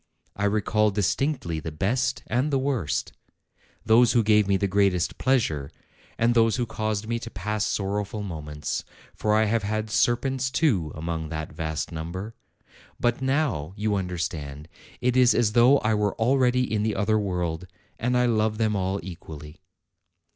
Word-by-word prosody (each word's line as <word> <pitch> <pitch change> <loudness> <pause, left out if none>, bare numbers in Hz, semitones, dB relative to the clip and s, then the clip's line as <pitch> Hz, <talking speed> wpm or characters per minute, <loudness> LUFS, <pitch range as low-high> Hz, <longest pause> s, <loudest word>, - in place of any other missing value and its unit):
I 105 - -1
recall 105 +1 +2
distinctly 105 - -1
the 80 +1 -6
best 120 - -1
and 125 +6 0
the 140 - +1
worst: 130 - -1 0.7
those 115 +2 +5
who 120 - +4
gave 105 -1 +4
me 100 -1 +3
the 100 - 0
greatest 95 -2 +1
pleasure, 80 - +1 0.5
and 115 +1 +3
those 115 -1 +3
who 125 - -1
caused 110 -2 -3
me 115 0 -1
to 115 - -7
pass 105 -2 -2
sorrowful 105 +1 -2
moments; 75 -5 -4 0.3
for 105 0 0
I 110 +1 +4
have 115 +2 +1
had 110 +1 -2
serpents, 130 +3 +1
too, 120 - +1
among 80 0 -4
that 80 0 -5
vast 80 -2 -3
number! 85 +7 -5 0.7
But 120 +1 0
now, 130 - 0
you 105 +1 -1
understand, 85 -6 -4 0.3
it 125 0 +1
is 125 -1 +5
as 115 -3 +2
though 120 +4 +6
I 110 - +1
were 105 -1 0
al 120 +4 +3
ready 125 -1 +3
in 110 -3 -1
the 110 0 0
other 110 +2 +1
world, 90 -3 -2 0.3
and 125 +2 +1
I 125 - +3
love 110 -2 +1
them 110 -1 +1
all 95 0 -1
equally." 80 -3 -10
105 Hz, 165 wpm, -25 LUFS, 90-120 Hz, 0.7 s, though